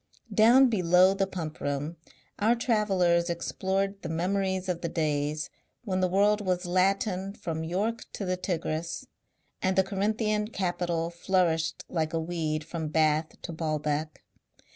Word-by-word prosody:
Down 235 +6 +7
below 185 -3 +4
the 195 0 0
Pump 165 -5 -5
Room 145 +3 -2 0.4
our 220 +3 +4
travellers 190 -7 +2
explored 195 +3 -1
the - - -5
memories 190 +2 -1
of 175 -2 -2
the 170 - -2
days 150 -1 -1 0.3
when 190 -5 -1
the 185 - +3
world 205 +3 +3
was 180 -1 0
Latin 190 +1 +1
from 160 -1 -4
York 200 +8 -2
to 200 - -4
the 185 0 0
Tigris, 165 -2 -3 0.6
and 185 0 +1
the 190 - +5
Corinthian 210 +2 0
capital 175 -4 -1
flourished 170 -2 0
like 160 -2 -2
a 165 - +1
weed 160 -2 -2
from 160 0 -4
Bath 155 0 +1
to 170 - -5
Baalbek. 155 -1 -2
180 Hz, 140 wpm, -28 LUFS, 160-195 Hz, 0.6 s, Down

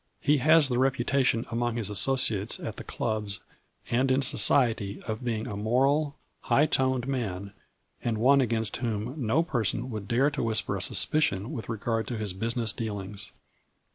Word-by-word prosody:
He 150 +1 +2
has 155 +2 +5
the 125 -2 -1
reputation 130 -2 +1
among 120 0 -1
his 110 -4 +1
associates 105 -2 +2
at - - -6
the - - -7
clubs, 105 -3 -3 0.5
and 130 +3 +2
in 130 +1 +2
society, 110 -3 +2
of 110 +3 -5
being 115 -3 -2
a 105 - -5
moral, 135 +7 +1 0.2
high 145 - +2
toned 130 -3 0
man, 100 -7 -3 0.5
and 115 -2 -1
one 135 +5 +4
against 115 -3 -1
whom 115 0 -3
no 135 +9 +2
person 120 - -1
would 105 -2 -6
dare 135 +5 +2
to 140 - -3
whisper 110 -3 +1
a 95 - -3
sus 95 - +5
picion 115 -9 0
with 115 -8 -6
regard 115 0 -2
to 120 - -4
his 105 -3 -3
business 115 +3 -1
dealings. 105 -3 -4
115 Hz, 170 wpm, -27 LUFS, 110-130 Hz, 0.5 s, has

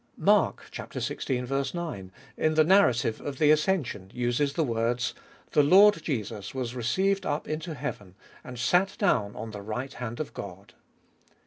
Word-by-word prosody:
Mark - - +3
(xvi. - - -5
19) 130 - -3 0.2
in 155 - +1
the 155 - +6
narrative 155 - +3
of 140 -2 -5
the 150 +1 +5
ascension, 150 - 0
uses 125 +4 0
the 160 - +1
words, 120 -1 -1 0.2
" - - -29
The 150 - +5
Lord 195 +8 +6
Jesus 110 - -4
was 125 -2 -3
received 190 - 0
up 145 +2 -2
into 155 +1 -4
heaven, 105 -10 -6 0.3
and 125 -1 -9
sat 180 +11 +2
down 105 -3 +1
at 110 0 -6
the 105 -1 -7
right 115 +6 -5
hand 120 -1 -6
of 155 - -4
God." 100 +1 -9
130 Hz, 155 wpm, -27 LUFS, 115-155 Hz, 0.3 s, the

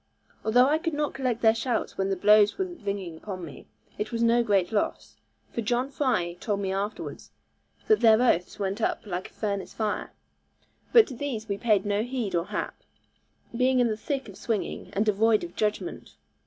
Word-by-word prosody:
Although 245 +3 +5
I 300 +3 +2
could 330 -2 -2
not 295 0 -1
collect 250 -4 -2
their 220 -1 +6
shouts 230 0 -2
when 195 0 -1
the 195 - +1
blows 210 +2 +5
were 380 - 0
ringing 200 - -5
upon 185 0 -6
me, 150 - -12 0.3
it 210 0 -3
was 230 0 0
no 235 +1 +4
great 200 -6 +1
loss; 210 - -2 0.4
for 235 - -2
John 245 +4 0
Fry 245 -12 0
told 205 -1 -1
me 190 -1 -1
afterwards 200 +3 -4 0.6
that 435 -1 +5
their 220 -1 +6
oaths 210 -9 +2
went 200 +2 -2
up - - -1
like 185 -2 -4
a - - -28
furnace 200 -2 -3
fire. 215 -2 -2 0.8
But 460 -3 +8
to - - -6
these 240 -4 -4
we 200 -1 -3
paid 210 -4 +2
no 205 0 +1
heed 245 -3 -3
or 170 0 +1
hap, - - -4 0.7
being 255 +1 +3
in 245 -1 +3
the 215 - -1
thick 270 +4 -3
of 200 - -11
swinging, 225 -4 -3
and 205 +2 +1
devoid 215 +1 +3
of 175 0 -8
judgment. 210 - -3
215 Hz, 195 wpm, -27 LUFS, 200-245 Hz, 0.8 s, But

